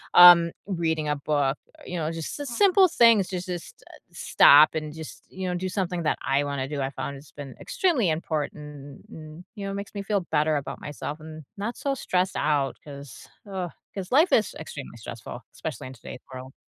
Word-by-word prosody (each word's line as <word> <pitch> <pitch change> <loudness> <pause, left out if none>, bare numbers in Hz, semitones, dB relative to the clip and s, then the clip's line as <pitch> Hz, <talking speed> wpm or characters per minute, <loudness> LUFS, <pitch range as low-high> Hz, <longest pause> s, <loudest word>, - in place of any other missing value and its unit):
um, 175 -1 +10 0.2
reading 160 -5 -1
a 150 - +1
book, 145 -1 0 0.2
uh, - - -16
you 180 - -6
know, 155 -2 -2
it's 165 +1 -4
just 160 - -5
the 290 - -5
simple 375 +8 +4
things 230 - +5
to 185 -2 -3
just, 180 -1 -7
uh, - - -14
stop 150 +2 +6
and 155 -1 -4
just, 160 -1 -10
you 190 0 -5
know, 180 - -1
do 185 +1 -3
something 180 -3 -2
that 155 - +1
I 140 +1 +2
wanna 140 -2 -3
do, 145 -1 -4
I 135 - -1
found 140 0 -5
it's 140 +1 -15
been 140 -2 -9
extremely 335 - +1
important, 150 -3 -5
and 155 +2 -11
you 200 -2 -6
know, 195 - -3
it - - -4
makes 200 0 -6
me 200 - -4
feel 200 0 0
better 155 0 +2
about 135 -1 -6
myself 145 +1 -6
and 155 0 -10
not 210 +4 -4
so 280 - -1
stressed 185 -7 -1
out, 145 -3 +1
'cause, 140 -4 -11 0.2
ugh, 185 -2 -3 0.2
'cause 190 -2 -6
life 310 +8 +5
is 215 - +3
extremely 140 -6 -8
stressful, 115 +2 -8
especially 155 -5 -6
in 130 - -9
today's 125 0 -10
world. 130 +1 -9
160 Hz, 210 wpm, -26 LUFS, 145-190 Hz, 0.2 s, um